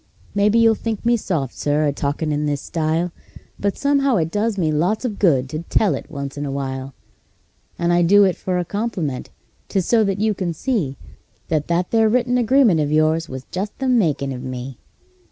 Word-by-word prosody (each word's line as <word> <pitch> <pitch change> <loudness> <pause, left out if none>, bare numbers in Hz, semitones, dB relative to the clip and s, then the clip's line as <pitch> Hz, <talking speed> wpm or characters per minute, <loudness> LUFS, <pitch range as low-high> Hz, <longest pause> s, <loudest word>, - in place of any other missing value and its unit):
Maybe 205 +2 +3
you'll 225 -1 +5
think 220 0 -4
me 240 0 +4
soft, 160 - -2
Sir, 150 +1 0
a 145 - +1
talkin' 145 +2 -2
in 150 0 0
this 145 -1 -1
style, 165 +2 -1 0.5
But 200 -1 -1
somehow 280 -2 +2
it 165 -4 0
does 210 +2 0
me 160 -4 +1
lots 180 - 0
of 215 -5 -3
good 135 -9 +3
to 155 - -4
tell 185 +4 +1
it - - -6
once 140 -2 -6
in - - -3
a 145 - -3
while; 135 -1 -4 0.8
And 170 0 +1
I 175 - +4
do 200 +4 +6
it 185 -2 +2
for 185 -1 -2
a 180 - -1
compliment 185 - -3 0.4
'tis 190 -4 0
so 225 +2 +3
that 195 -1 -1
you 215 +1 +1
can 180 -4 -3
see 160 - -1 0.5
That 155 -2 0
that 175 +1 0
there 225 -1 +4
written 245 +2 +2
agreement 240 - +4
of 150 -1 0
yours 155 +1 +2
was 130 0 -7
just 195 +3 -4
the 265 - -2
makin' 160 - +1
of 125 -1 -5
me. 130 -1 -6
175 Hz, 205 wpm, -21 LUFS, 145-215 Hz, 0.8 s, do